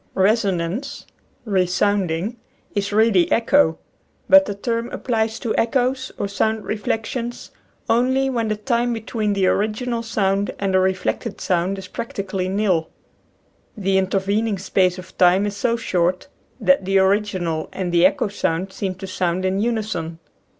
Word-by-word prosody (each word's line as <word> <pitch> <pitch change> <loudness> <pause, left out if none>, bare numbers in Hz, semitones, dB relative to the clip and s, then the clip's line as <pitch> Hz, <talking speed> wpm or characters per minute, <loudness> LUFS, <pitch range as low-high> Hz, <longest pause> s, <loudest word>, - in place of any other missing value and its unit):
Resonance 200 +5 0 0.4
(re 190 -4 +1
sounding) 195 +2 0 0.4
is 200 -1 -1
really 210 -4 +3
echo; 230 - +3 0.5
but 290 0 +7
the 205 - -4
term 230 +3 -2
applies 225 -3 -1
to 230 -2 -2
echoes, 260 +2 0
or 200 - -2
sound 215 +2 -1
reflec 220 +2 -2
tions, 240 -1 -5 0.4
only 260 +3 +2
when 235 -4 -1
the 215 - 0
time 235 +2 0
between 220 -2 -2
the 195 -1 +1
original 220 +5 0
sound 200 -3 0
and 195 -1 -1
the 190 - +5
reflected 190 +4 -1
sound 180 +2 0
is 190 -1 -8
practically 195 -3 -4
nil. 190 -5 +1 0.9
The 195 -1 +2
intervening 200 +3 0
space 185 -1 +1
of 185 0 -11
time 185 +2 +5
is 205 -1 -3
so 235 +2 +1
short 180 -2 0 0.3
that 275 -6 +3
the 195 +1 +2
original 190 -5 +1
and 185 -2 -3
the 170 0 +3
echo 190 +3 +3
sound 190 -2 -2
seem 190 -2 -3
to 190 +2 -8
sound 185 -1 -1
in 190 +1 0
unison. 215 -7 -2
200 Hz, 150 wpm, -21 LUFS, 185-230 Hz, 0.9 s, but